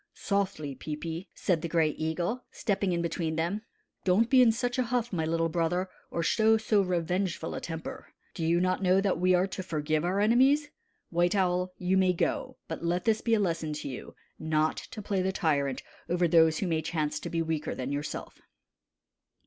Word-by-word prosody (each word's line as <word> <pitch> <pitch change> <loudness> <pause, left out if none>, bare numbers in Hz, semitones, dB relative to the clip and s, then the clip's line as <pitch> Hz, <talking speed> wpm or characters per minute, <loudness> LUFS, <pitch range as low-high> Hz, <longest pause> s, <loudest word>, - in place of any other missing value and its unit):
"Softly, 190 -8 -1
Peepi," 160 +6 -5
said 175 -4 0
the 170 - -2
Gray 160 -2 +2
Eagle, 170 +11 -2
stepping 200 -3 -1
in 170 -1 0
between 165 -1 -2
them. 170 +6 -1 0.4
"Don't 210 +7 +3
be 260 -1 +7
in 240 -2 +6
such 245 +2 -2
a - - +4
huff, 240 -1 -1
my 160 -3 0
little 165 +1 +1
brother, 175 +3 0 0.2
or 170 - -2
show 220 +5 +4
so 215 -2 +2
revengeful 180 -1 -1
a - - -4
temper. 165 -1 -6 0.3
Do 165 - -4
you 170 +2 +3
not 185 +1 +1
know 185 0 +4
that 195 -4 +1
we 185 +1 +4
are 180 +1 +3
to 195 0 -5
forgive 155 -3 -1
our 185 +3 0
enemies? 265 +8 +4 0.4
White 175 +3 +2
Owl, 180 -1 +1
you 185 +1 +1
may 185 -1 +4
go; 170 - -1
but 160 0 -5
let 175 +1 0
this 220 -1 +2
be 230 -1 +2
a - - +1
lesson 165 -5 -1
to 150 - -5
you, 130 - -8 0.2
not 155 0 +1
to 215 - -8
play 200 -2 0
the 190 +1 0
tyrant 140 -7 0 0.3
over 175 0 +2
those 160 -1 +5
who 195 - -1
may 160 -2 +1
chance 155 -2 -2
to - - -6
be 165 -1 0
weaker 160 -2 -2
than 130 +1 -4
yourself." 145 +1 -5
175 Hz, 195 wpm, -29 LUFS, 160-195 Hz, 0.4 s, be